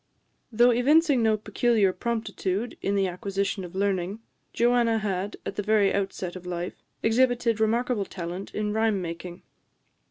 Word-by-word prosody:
Though 240 +2 +5
evincing 280 +3 +4
no 220 -1 +3
peculiar 210 -1 +2
promptitude 220 0 -2
in 200 - 0
the 195 -1 +2
acquisition 195 +2 -2
of 180 +1 -9
learning, 195 0 -1 0.3
Joanna 235 -1 +3
had, 200 -1 -2
at 200 - -5
the - - +1
very 210 -1 +3
outset 195 -2 -3
of 180 -1 -9
life, 175 0 -5 0.2
exhibited 240 -1 +2
remarkable 225 -1 +1
talent 180 +1 -6
in 210 0 -1
rhyme 220 -2 +1
making. 175 0 -7
210 Hz, 145 wpm, -26 LUFS, 190-230 Hz, 0.3 s, Though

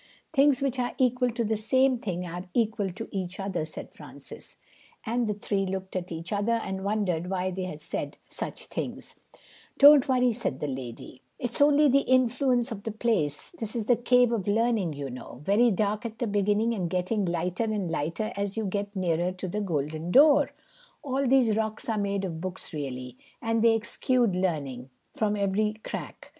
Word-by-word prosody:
"Things 280 -1 +4
which 265 -2 -1
are 245 0 -1
equal 250 -1 +2
to 235 0 -2
the 220 0 0
same 260 +4 +2
thing 180 -5 -3
are 175 +1 -6
equal 220 -4 +1
to 200 +5 -7
each 185 -2 -4
other," 195 -5 -2
said 155 - -8
Francis; - - -11 0.5
and 235 +1 0
the 210 - -1
three 200 -1 -1
looked 190 0 -4
at 180 -1 -3
each 165 +4 -5
other 205 +3 +1
and 190 -4 -2
wondered 190 -5 -1
why 185 -1 -1
they 185 0 -3
had 155 -4 -7
said - - -4
such - - -5
things. - - -6 0.6
"Don't 285 0 +8
worry," 250 -2 +3
said 215 - -3
the - - -2
lady, 130 -1 -7 0.2
"it's 245 +2 -3
only 290 +1 +6
the 275 0 +5
influence 255 -1 +2
of 210 -3 -5
the 225 - -4
place. 210 -10 -1
This 220 -2 -4
is 225 -3 -1
the 245 - +4
Cave 245 0 +3
of 215 -5 -1
Learning, 220 -4 +2
you 140 -2 -5
know, 125 0 -9
very 215 +8 +4
dark 210 +1 0
at 225 -1 -6
the 240 - -1
beginning 210 +2 +1
and 185 -6 -2
getting 185 +4 0
lighter 180 +4 -1
and 205 -6 -2
lighter 165 +8 -2
as 200 +1 -3
you 220 - -1
get 200 +1 -3
nearer 175 -1 0
to 185 0 -5
the 210 +4 -2
golden 155 -2 -2
door. 285 - +6 0.5
All 275 -1 0
these 245 -4 +4
rocks 220 0 -2
are 220 -2 0
made 200 -1 -1
of 165 -3 -5
books 185 -1 -5
really, 130 -4 -5 0.2
and 225 -1 0
they 230 -1 +6
exude 230 -1 +1
learning 140 -9 -2 0.2
from 210 -1 0
every 205 +2 0
crack. - - -7
205 Hz, 190 wpm, -27 LUFS, 180-235 Hz, 0.6 s, Don't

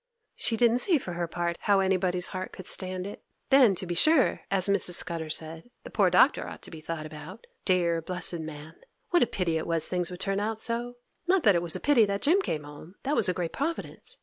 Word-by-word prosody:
She 225 - 0
didn't 235 +1 +3
see 345 +3 +3
for 185 -10 -6
her 170 0 -3
part 170 0 -3
how 200 -1 +2
anybody's 185 -1 +1
heart 185 0 -5
could 185 - -10
stand 185 -1 -1
it. 200 - -9 0.3
Then, 255 -7 +6
to 185 - -2
be 175 - -3
sure, 295 - +3
as 190 -1 +2
Mrs. 200 -3 +2
Scudder 165 -3 -1
said, 160 +6 -2
the - - -10
poor - - +3
Doctor - - +3
ought - - -10
to - - -9
be 160 -2 -9
thought 160 -1 -5
about. 155 +7 -10 0.2
Dear, 170 -3 +1
blessed 180 0 +1
man! 155 0 -8 0.4
What 350 - +4
a 245 - +4
pity 170 -5 -1
it - - -6
was 165 -2 0
things 180 -2 -1
would 180 -1 -8
turn 195 0 0
out 215 +1 -2
so! 235 +2 -4 0.3
Not 370 -2 +3
that 205 - +6
it 170 - +1
was 170 -2 +1
a - - -3
pity 270 -7 +4
that 200 0 -3
Jim 355 +7 +4
came 155 - -3
home! 150 +5 -12
That 285 +3 0
was 200 - +2
a - - +1
great 170 -1 -4
providence! 325 +4 -5
185 Hz, 235 wpm, -27 LUFS, 170-220 Hz, 0.4 s, Then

